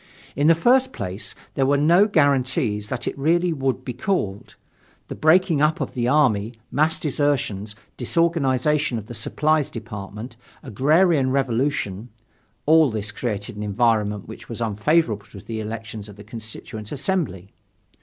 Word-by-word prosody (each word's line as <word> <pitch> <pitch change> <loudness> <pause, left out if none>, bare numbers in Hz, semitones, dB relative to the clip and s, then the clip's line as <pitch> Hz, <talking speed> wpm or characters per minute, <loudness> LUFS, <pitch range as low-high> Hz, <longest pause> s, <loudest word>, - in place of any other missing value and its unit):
In 145 +2 +2
the 165 - +7
first 255 +9 +3
place, 95 -1 -4 0.2
there 135 -1 +1
were 140 +1 +3
no 170 +8 +5
guarantees 130 - +1
that 125 +2 -4
it - - -2
really 170 +4 +2
would 135 -3 -2
be 125 - -4
called. 120 - -2 0.5
The - - -4
breaking 160 -1 +3
up 155 +3 +2
of - - -3
the 120 -2 -1
army, 120 -6 +2 0.2
mass 155 +3 +2
desertions, 130 -9 -1 0.2
disorganization 150 -2 +1
of 110 - -6
the 120 - -9
supplies 150 +6 0
department, 110 0 -8 0.3
agrarian 145 - +3
revolution 125 -5 -1 0.6
all 160 -1 +5
this 105 -2 -2
created 105 -1 -4
an - - -5
environment 105 -1 0
which 110 - -11
was 115 - -6
unfavorable 110 0 +1
to 100 - -11
the 110 +3 -6
elections 110 -1 -6
for 105 - -11
the 105 +1 -13
Constituent 110 0 -8
Assembly. 140 - -2
125 Hz, 145 wpm, -23 LUFS, 105-150 Hz, 0.6 s, the